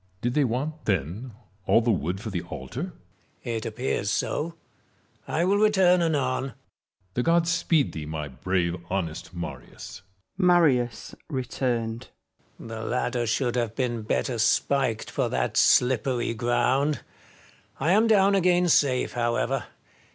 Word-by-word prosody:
Did 120 +3 -1
they 150 - +3
want, 140 +6 -3
then, 95 - -2 0.3
all - - +5
the 120 0 +1
wood 90 -1 -1
for 110 +1 -6
the 90 -2 -2
altar 85 - -6 0.6
1 - - -28
Marius. 115 -1 -2
It 110 - -6
appears 110 -3 -2
so 165 +9 -1 0.4
— - - -38
I 165 +2 0
will 195 +2 +3
return 190 -4 +4
anon. 140 -6 +1
Metellus. 135 -4 -7 0.6
The 125 - 0
gods 170 +4 +2
speed 165 -4 +2
thee, 75 -2 -6
my 75 -1 -4
brave, 85 +5 -1
honest 85 -5 -3
Marius! 85 +1 -8 0.4
Marius 160 -10 +3 0.2
{returned). 125 -3 -2 0.5
The 110 -1 -7
ladder 120 0 -1
should 120 +2 0
have 115 -3 -1
been 120 -3 -1
better 115 +2 -1
spiked 115 +1 +1
for - - 0
that 60 -1 -1
slippery 125 -1 +3
ground. 125 +4 +1 0.8
I 155 +6 +1
am 215 +4 +4
down 200 -2 +5
again 180 -2 +3
safe, 135 -5 +2
however. 120 +2 0
125 Hz, 145 wpm, -26 LUFS, 110-150 Hz, 0.8 s, all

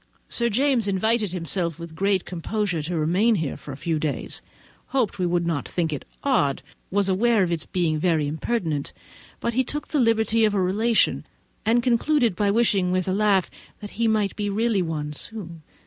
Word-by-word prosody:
Sir 235 0 +1
James 250 -1 +2
invited 210 +1 +1
himself 170 -2 -2
with 170 -1 -8
great 195 +2 +1
composure 180 0 -2
to 165 +3 -3
remain 185 +9 +3
here 160 -7 -1
a 135 -2 -6
few 165 -1 -1
days—hoped 200 - -4
we 180 - +1
would 175 0 +1
not 165 -4 -1
think 165 -3 -1
it 140 - -5 0.2
odd, 195 - +1 0.3
was 200 0 +1
aware 210 +2 +3
of 175 - -1
its 165 -2 -2
being 165 -4 0
very 160 -3 +2
impertinent, 160 -1 -2 0.5
but 235 - -1
he 260 +3 +2
took 295 +4 -4
the 300 - +1
liberty 225 -1 +3
of 210 -1 +3
a - - +2
relation; 210 +5 +2 0.4
and 235 +2 +3
concluded 245 - +2
by 205 +2 +1
wishing, 200 -4 +2
with 185 0 0
a 185 - +1
laugh, 200 -2 +2 0.3
that 205 -1 -8
he 230 +1 0
might 215 -2 +1
be 205 -1 -2
really 215 0 +1
one 155 -3 -3
very - - -7
soon. 170 -1 -7
195 Hz, 185 wpm, -24 LUFS, 170-225 Hz, 0.5 s, remain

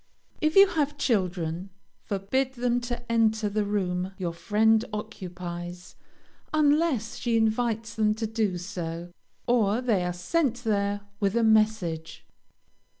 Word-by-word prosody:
If 310 +1 +1
you 395 0 +10
have 295 -3 -1
children, 185 - -1 0.4
forbid 250 +7 -1
them 245 0 0
to 240 0 -5
enter 220 -2 +2
the 210 +1 0
room 190 -2 -1
your 175 -4 -3
friend 220 +5 +3
occupies, 180 -4 -7 0.6
unless 295 -6 +2
she 235 -2 +1
invites 225 0 0
them 215 -1 +2
to 220 +1 -2
do 215 -4 -1
so, 175 -2 -5 0.3
or 230 -3 +2
they 225 -8 +1
are 180 - -1
sent 245 - -1
there 205 -2 0 0.2
with 200 0 +1
a 235 - +3
message. 215 -7 +1
215 Hz, 130 wpm, -27 LUFS, 185-235 Hz, 0.6 s, you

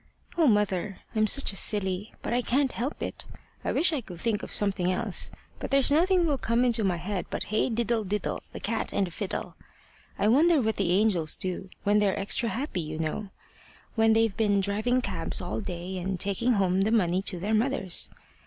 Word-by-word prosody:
O, 330 -3 +4
mother, 205 -3 +1
I'm 215 0 +3
such 275 -2 +4
a - - -7
silly! 195 0 +1
But - - -2
I 245 - +2
can't 265 +2 +1
help 255 +6 -4
it. - - -6 0.4
I - - -1
wish 345 0 +3
I 290 - -1
could 180 -6 -10
think 225 -1 0
of - - -7
something 190 -3 0
else, 200 +1 -1 0.3
but - - -5
there's 275 0 +4
nothing 355 +3 +4
will 290 -4 0
come 235 +2 +1
into 235 -2 +2
my 185 -3 +1
head 185 +2 -4
but - - -3
hey 215 +4 0
diddle 235 -1 0
diddle! 205 0 -2
the - - -7
cat 225 +1 -2
and 200 - +2
the 175 - -8
fiddle! 195 +3 -5 0.6
I 205 - +1
wonder 310 +8 +5
what 220 -3 0
the 195 -4 0
angels 185 -6 +2
do 185 +1 -4
when 205 +1 +3
they're 200 -2 +1
extra 215 +4 +1
happy, 245 - -3
you 155 0 -5
know 160 +6 -3 0.6
when 225 -1 +4
they've 225 -2 +2
been 205 -3 +2
driving 215 +6 +1
cabs - - -3
all - - -3
day 185 -1 -5
and 185 0 -3
taking 200 +7 +1
home 190 -2 +2
the 205 - +2
money 185 -5 +2
to 190 -2 -2
their 205 +5 -2
mothers. 220 -5 0
210 Hz, 205 wpm, -27 LUFS, 190-235 Hz, 0.6 s, wonder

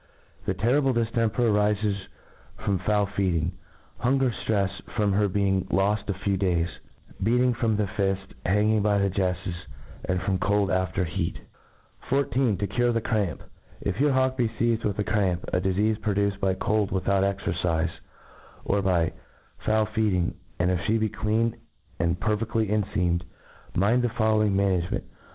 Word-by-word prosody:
This - - 0
terrible 130 +4 +2
diftemper 115 -1 0
arifes 105 -2 +1 0.5
firom 95 -3 0
foul 105 +1 +2
feedr 100 -3 0
ing^ 85 +3 -1 0.5
hunger 130 0 +2
ftrefs 100 -3 -1
from 105 -2 +2
her 105 +1 +3
being 95 -1 +1
loft 105 +2 +1
a - - +2
few 95 +1 -1
days, 90 -3 +1 0.5
beating 125 +4 +3
from 115 -2 0
the 105 - +1
fift, 95 -1 -2
hanging 105 +3 +2
by 105 0 +2
the 100 -1 +1
jefTes, 90 -1 -1 0.5
and 90 -1 0
from 95 -2 0
cold 100 +1 +1
after 95 +1 0
heat. 85 0 -2 0.7
ij{. 130 -5 +1
To 100 - -1
cure 120 +3 +1
the 115 - +1
Cramf. 105 -6 -1 0.4
If 100 +1 -3
your 145 -1 +4
hawk 130 0 +2
be 120 -3 +2
feized 115 0 0
with 100 -2 -1
the 105 - +1
cramp, 95 -4 0
a 90 - +2
difeafe 105 +4 +1
produced 100 -2 0
by 95 -1 +2
cold 105 +1 0
without 95 +1 +1
exercife, 85 -4 0 0.7
or 100 0 +1
by 90 -4 +1 0.5
foul 110 0 +2
feeding, 105 -5 0 0.2
and 90 +1 +2
if 90 - +1
flie 110 +4 +2
be 110 -1 0
clean 110 +2 0 0.4
and 85 +2 +1
perfcd*. 110 +1 0
lyenfeamed, 95 -4 0 0.5
mind 110 +7 +3
the 120 - +1
following 110 -3 +2
management. 95 -3 +1
100 Hz, 155 wpm, -26 LUFS, 95-110 Hz, 0.7 s, your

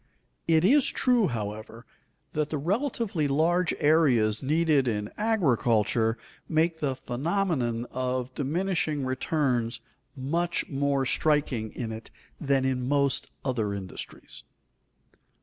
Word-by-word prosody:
It 165 0 +4
is 275 +6 +5
true, 245 -5 +3
however, 110 +1 -5 0.5
that 150 -1 -1
the 155 - -2
relatively 200 - -1
large 165 +5 +2
areas 130 -9 +3
needed 150 -1 +2
in 105 -2 -2
agriculture 120 - +2 0.3
make 160 +1 +1
the 140 -4 -1
phenomenon 130 -3 -1
of 130 0 -2
diminishing 155 -1 -1
returns 130 -3 0 0.4
much 170 +6 -1
more 140 -1 0
striking 140 -7 +1
in 115 -3 -4
it 110 0 -7 0.3
than 135 -2 +1
in 125 -1 -1
most 140 -2 +1 0.2
other 110 -6 -1
industries. 95 -2 -7
140 Hz, 110 wpm, -27 LUFS, 120-165 Hz, 0.5 s, is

